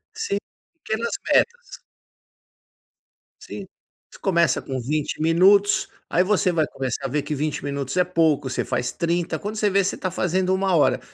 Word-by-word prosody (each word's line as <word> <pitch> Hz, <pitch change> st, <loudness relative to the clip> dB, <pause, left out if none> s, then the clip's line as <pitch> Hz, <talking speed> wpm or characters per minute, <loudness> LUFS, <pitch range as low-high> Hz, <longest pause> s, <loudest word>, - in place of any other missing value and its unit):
Sim, 440 Hz, -, -2 dB, 0.4 s
pequenas 230 Hz, -6 st, -3 dB, 0.2 s
metas. 485 Hz, +1 st, +1 dB, 1.6 s
Sim. -, -, -8 dB, 0.5 s
Você -, -, -14 dB
começa 170 Hz, -7 st, +2 dB
com 130 Hz, -1 st, -4 dB
20 150 Hz, +6 st, -2 dB
minutos, 190 Hz, +6 st, +4 dB, 0.2 s
aí 180 Hz, -, +2 dB
você 185 Hz, -2 st, +2 dB
vai 160 Hz, -3 st, +1 dB
começar 135 Hz, +1 st, -4 dB
a -, -, +1 dB
ver 145 Hz, +2 st, -1 dB
que 150 Hz, -, -4 dB
20 150 Hz, 0 st, -2 dB
minutos 140 Hz, +2 st, -3 dB
é 180 Hz, -, +5 dB
pouco, 160 Hz, -6 st, +1 dB
você 130 Hz, -, -2 dB
faz 125 Hz, 0 st, -2 dB
30, 170 Hz, 0 st, -1 dB
quando 210 Hz, +1 st, -5 dB
você 210 Hz, -2 st, +1 dB
ver 195 Hz, 0 st, +3 dB
você 190 Hz, -, -2 dB
tá 185 Hz, -, -3 dB
fazendo 185 Hz, +1 st, 0 dB
1 190 Hz, -1 st, +1 dB
hora, 150 Hz, -, +3 dB
170 Hz, 165 wpm, -23 LUFS, 145-195 Hz, 1.6 s, é